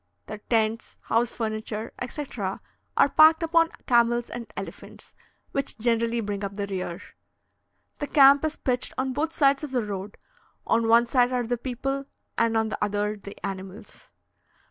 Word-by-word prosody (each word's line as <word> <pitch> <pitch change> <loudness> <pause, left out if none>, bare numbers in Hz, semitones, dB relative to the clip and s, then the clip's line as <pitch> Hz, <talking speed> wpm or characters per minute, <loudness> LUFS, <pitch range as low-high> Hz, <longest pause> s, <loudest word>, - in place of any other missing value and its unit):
Their 210 - -7
tents, 225 -1 0
house 235 +1 +1
furniture, 215 -1 -4
etc., 245 -7 -4 0.4
are - - +5
packed 315 +2 +6
upon 330 0 +3 0.2
camels 240 0 +2
and 240 -1 -7
elephants, - - -9 0.4
which 275 - -3
generally 230 0 +1
bring 205 -1 -4
up 200 0 -4
the 200 -1 -2
rear. 185 -3 -4 1.0
The 290 - -3
camp 280 0 +6
is 310 0 -1
pitched 250 -1 -1
on 260 0 -1
both 305 +4 -1
sides 280 -2 +3
of 300 - -4
the 250 -4 -1
road 200 0 -6 0.5
on 230 0 +2
one 230 +1 +6
side 245 +1 +2
are 250 -1 0
the 245 +2 0
people, 270 +3 -3 0.3
and 230 -1 +2
on 220 0 +1
the - - -3
other 210 +1 -1
the 200 -1 -11
animals. 195 +2 -8
235 Hz, 160 wpm, -26 LUFS, 210-265 Hz, 1.0 s, packed